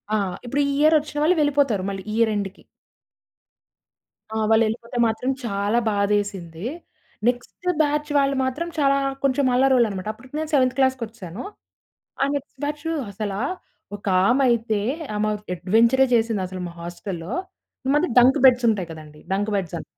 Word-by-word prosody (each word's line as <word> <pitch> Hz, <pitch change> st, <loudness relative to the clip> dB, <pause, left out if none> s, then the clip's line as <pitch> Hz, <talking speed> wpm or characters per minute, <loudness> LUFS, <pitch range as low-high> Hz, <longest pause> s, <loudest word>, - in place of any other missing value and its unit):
ఆ! -, -, +3 dB, 0.3 s
ఇప్పుడు 275 Hz, +4 st, 0 dB
ఈ -, -, -1 dB
ఇయర్ 310 Hz, +2 st, +5 dB
వచ్చిన 295 Hz, 0 st, -9 dB
వాళ్ళు 345 Hz, +4 st, +4 dB
వెళ్ళిపోతారు 280 Hz, -9 st, +2 dB
మళ్ళీ 195 Hz, -1 st, -5 dB
ఇయర్ 225 Hz, 0 st, +3 dB
ఎండ్‌కి. 200 Hz, -1 st, -4 dB, 1.7 s
ఆ! -, -, 0 dB
వాళ్ళెళ్ళిపోతే 230 Hz, +2 st, +1 dB
మాత్రం 225 Hz, +3 st, -2 dB, 0.2 s
చాలా 205 Hz, +2 st, 0 dB
బాధేసింది. 200 Hz, -4 st, -1 dB, 0.6 s
నెక్స్ట్ 245 Hz, +8 st, -2 dB
బ్యాచ్ 300 Hz, 0 st, 0 dB
వాళ్ళు 275 Hz, 0 st, +2 dB
మాత్రం 295 Hz, +7 st, -2 dB
చాలా 275 Hz, -1 st, +3 dB, 0.3 s
కొంచెం 275 Hz, 0 st, +2 dB
అల్లరోళ్ళన్నమాట 240 Hz, -7 st, +2 dB
అప్పటికి 255 Hz, +5 st, -14 dB
నేను 315 Hz, -1 st, -3 dB
7త్ 255 Hz, -3 st, +3 dB
క్లాస్‌కొచ్చేశాను. 230 Hz, -8 st, -2 dB, 0.8 s
ఆ -, -, +4 dB
నెక్స్ట్ 275 Hz, -1 st, -6 dB
బ్యాచు 295 Hz, +2 st, -3 dB, 0.2 s
అసలా 200 Hz, 0 st, -4 dB, 0.6 s
ఒకామయితే 220 Hz, +3 st, +2 dB, 0.3 s
ఆమె 210 Hz, +1 st, 0 dB, 0.3 s
అడ్వెంచరే 230 Hz, +9 st, +3 dB
జేసింది 225 Hz, -4 st, +2 dB
అసలు 185 Hz, 0 st, -7 dB
మా 170 Hz, -, -9 dB
హాస్టల్‌లో. 175 Hz, +2 st, -6 dB, 0.5 s
ఈ -, -, +1 dB
మధ్య 315 Hz, +5 st, +2 dB
డంక్ 255 Hz, +2 st, +5 dB
బెడ్స్ 250 Hz, -1 st, +4 dB
ఉంటాయి 190 Hz, -5 st, -3 dB
కదండీ! 155 Hz, -1 st, -12 dB
డంక్ 205 Hz, +2 st, -1 dB
బెడ్స్ 175 Hz, -3 st, -4 dB
అని. -, -, -8 dB
230 Hz, 140 wpm, -23 LUFS, 200-270 Hz, 1.7 s, ఇయర్